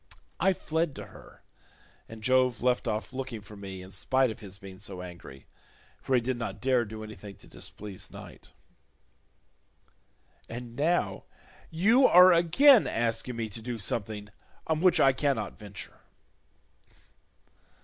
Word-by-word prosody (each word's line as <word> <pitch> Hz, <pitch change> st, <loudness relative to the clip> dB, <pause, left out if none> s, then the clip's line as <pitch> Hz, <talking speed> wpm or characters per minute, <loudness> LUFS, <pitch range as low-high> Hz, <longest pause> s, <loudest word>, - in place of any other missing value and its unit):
I 190 Hz, -, +3 dB
fled 160 Hz, -3 st, -2 dB
to -, -, -7 dB
her -, -, -16 dB, 0.7 s
and 110 Hz, -1 st, -11 dB
Jove 130 Hz, -2 st, +2 dB
left 125 Hz, 0 st, +1 dB
off 105 Hz, +2 st, -3 dB
looking 130 Hz, -4 st, -5 dB
for 105 Hz, +1 st, -13 dB
me 95 Hz, -2 st, -8 dB
in 95 Hz, -, -12 dB
spite 130 Hz, +6 st, +1 dB
of -, -, -9 dB
his 100 Hz, -3 st, -9 dB
being 95 Hz, -2 st, -11 dB
so 95 Hz, -3 st, -6 dB
angry, 85 Hz, -7 st, -11 dB, 0.6 s
for 130 Hz, -, 0 dB
he 125 Hz, -, +3 dB
did 125 Hz, +1 st, -2 dB
not 120 Hz, -, -5 dB
dare 130 Hz, -2 st, +2 dB
do 110 Hz, 0 st, -8 dB
anything 105 Hz, -2 st, -10 dB
to -, -, -18 dB
displease 100 Hz, -2 st, -7 dB
Night. -, -, -12 dB, 2.0 s
And 120 Hz, 0 st, -8 dB
now 145 Hz, -, 0 dB, 0.4 s
you 220 Hz, +11 st, +4 dB
are 180 Hz, +1 st, +8 dB
again 220 Hz, -, +6 dB
asking 115 Hz, +2 st, -2 dB
me 115 Hz, -1 st, -3 dB
to 110 Hz, +3 st, -8 dB
do 120 Hz, +1 st, -4 dB
something 105 Hz, 0 st, -4 dB, 0.4 s
on 160 Hz, 0 st, 0 dB
which 185 Hz, -1 st, +4 dB
I 135 Hz, -1 st, +5 dB
cannot 135 Hz, -5 st, -1 dB
venture." 100 Hz, -2 st, -10 dB
115 Hz, 145 wpm, -28 LUFS, 105-135 Hz, 2.0 s, are